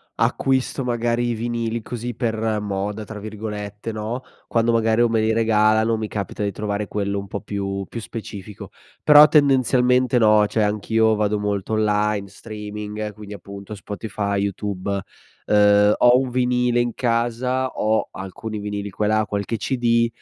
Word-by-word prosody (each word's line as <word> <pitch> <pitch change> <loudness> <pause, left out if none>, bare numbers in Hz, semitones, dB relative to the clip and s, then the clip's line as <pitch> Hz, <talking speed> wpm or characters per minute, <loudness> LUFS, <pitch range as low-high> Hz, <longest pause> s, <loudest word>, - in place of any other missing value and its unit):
acquisto 135 0 0
magari 120 0 0
i - - 0
vinili 115 0 -2
così 120 +2 -5
per 110 -2 -1
"moda" 100 +1 -3
tra 110 0 -8
virgolette, 105 0 -6
no, 110 +3 -4 0.3
quando 115 0 +2
magari 115 0 +2
o 120 - +4
me 115 -1 +1
li 110 +1 +2
regalano 110 0 +3
o - - +1
mi 110 -1 -3
capita 105 0 -4
di 100 - 0
trovare 105 +1 -3
quello 100 -1 -2
un 100 - -4
po' 100 +1 -5
più 100 -1 -3
più 115 - -5
specifico. 105 -3 -8 0.3
Però 150 0 +9
tendenzialmente 130 -4 +3
no, 105 -2 +5
cioè 110 +1 -1
anch'io 110 +2 +2
vado 105 0 0
molto 105 0 -2
online, 105 -1 +1
streaming, 105 +1 -6
quindi 105 0 -10
appunto 100 0 -9
Spotify, 100 0 -4
YouTube. 100 -1 -3 0.5
Uhm, 105 0 +5
ho 125 +1 +6
un 130 -1 -2
vinile 125 -1 +1
in 120 -1 -1
casa, 120 +2 0
ho 110 -2 0
alcuni 105 +3 -6
vinili 100 0 -4
qua 105 - -2
e - - +2
là, 110 0 +2
qualche 100 +3 -3
CD, 115 0 +1
110 Hz, 160 wpm, -22 LUFS, 105-115 Hz, 0.5 s, Però